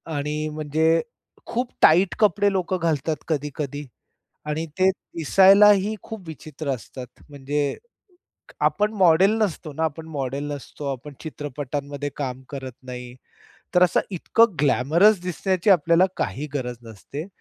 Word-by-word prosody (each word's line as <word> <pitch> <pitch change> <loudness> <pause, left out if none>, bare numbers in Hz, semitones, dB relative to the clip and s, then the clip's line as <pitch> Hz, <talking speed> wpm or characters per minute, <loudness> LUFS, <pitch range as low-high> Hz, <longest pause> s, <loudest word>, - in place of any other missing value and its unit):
आणि 150 +2 -2
म्हणजे 155 +2 +1 0.4
खूप 245 +1 -3
टाईट 175 +4 +5
कपडे 205 -1 +3
लोकं 185 -1 -1
घालतात 160 -1 0
कधी-कधी 145 -1 -3 0.6
आणि 150 +2 -2
ते 185 +1 +5
दिसायलाही 195 +4 +4
खूप 215 -6 -9
विचित्र 155 -1 -7
असतात. 125 +1 -10 0.2
म्हणजे 145 0 -2 0.8
आपण 210 +1 +1
मॉडेल 185 0 +5
नसतो 180 -7 -2
ना. 160 +3 -2
आपण 160 +1 -4
मॉडेल 140 -2 -3
नसतो- 145 +1 -8
आपण 135 +3 -9
चित्रपटांमध्ये 145 -1 -5
काम 130 -2 -4
करत 135 -3 -7
नाही. 125 -1 -8 0.6
तर 180 - +5
असं 180 - +4
इतकं 210 +4 +2
ग्लॅमरस 160 +9 +4
दिसण्याची 185 +2 0
आपल्याला 170 +1 +5
काही 145 +3 -3
गरज 125 -3 -3
नसते. 115 - -8
155 Hz, 125 wpm, -23 LUFS, 140-185 Hz, 0.8 s, टाईट